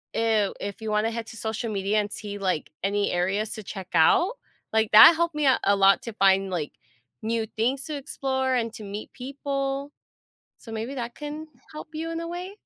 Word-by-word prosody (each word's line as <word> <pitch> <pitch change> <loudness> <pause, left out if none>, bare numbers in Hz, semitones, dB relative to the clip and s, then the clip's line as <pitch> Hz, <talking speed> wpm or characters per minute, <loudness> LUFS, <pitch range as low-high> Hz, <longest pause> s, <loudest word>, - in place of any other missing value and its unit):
i 220 -3 +2
if 200 +2 -6
you 220 - -4
wanna 215 +2 +1
head 230 0 -5
to 225 - -10
social 220 +1 -3
media, 200 +1 +1
and 205 0 -6
see, 205 -1 -6
like, 185 -6 -1
any 200 +1 +1
areas 195 +5 0
to 215 - -7
check 190 -2 -7
out, 345 - +4 0.4
like, 220 -1 +2
that 320 +9 +11
helped 340 -1 0
me 300 -1 0
out 265 - +4
a 200 - +4
lot 195 0 +5
to 230 - -5
find, 195 -1 +3
like, 165 -5 -3 0.5
new 225 0 -1
things 260 +5 0
to 305 - -4
explore, 265 -2 -2
and 230 -2 -1
to 215 - -9
meet 205 +1 -7
people, 275 +1 -3 0.7
so 225 - -11
maybe 225 +5 -4
that 240 -1 -5
can 300 +1 -6 0.3
help 305 - -8
you 325 +1 -4
in 330 - -3
a 335 - -5
way? 355 +2 -5
225 Hz, 205 wpm, -26 LUFS, 205-275 Hz, 0.7 s, that